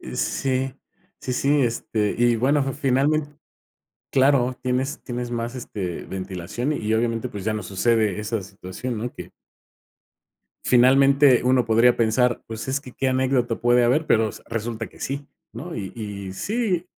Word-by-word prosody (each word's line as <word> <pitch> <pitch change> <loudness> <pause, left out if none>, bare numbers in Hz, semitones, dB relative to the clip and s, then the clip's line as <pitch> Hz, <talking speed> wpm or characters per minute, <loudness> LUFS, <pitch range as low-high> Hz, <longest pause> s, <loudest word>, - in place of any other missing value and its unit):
eh, - - -8
sí, 130 0 -1 0.5
sí, 130 - -3
sí, 140 +3 +2
este, 110 -3 -1
y 120 0 +3
bueno, 140 +5 +2
finalmen 145 +2 0 0.7
claro, 130 -2 +3
tienes 130 +3 -1
tienes 120 -1 -4
más, 120 0 -3
este, 100 -8 -5
ventilación 95 - -4
y, 110 -7 -2
obviamente, 115 +1 0
pues 100 -5 -7
ya 110 - 0
no 105 0 -3
sucede 110 0 +1
esa 110 0 -2
situación, 95 +5 -6
¿no? 120 +3 -4
Que. - - -9 1.3
Finalmente, 135 +1 +5
uno 125 0 +3
podría 115 +2 +4
pensar, 120 +2 +2
¿pues, 110 +1 -7
es 135 +2 0
que 130 - -11
qué 135 - -2
anécdota 130 -2 +1
puede 120 +1 +3
haber?, 135 +7 +2
pero 110 -4 +3
s - - -11
resulta 115 0 -4
que - - -19
sí, 140 +1 -4 0.3
no 160 +10 -7
y 95 -3 -5
y 100 -4 -6
sí 200 - -1
120 Hz, 155 wpm, -23 LUFS, 110-135 Hz, 1.3 s, Finalmente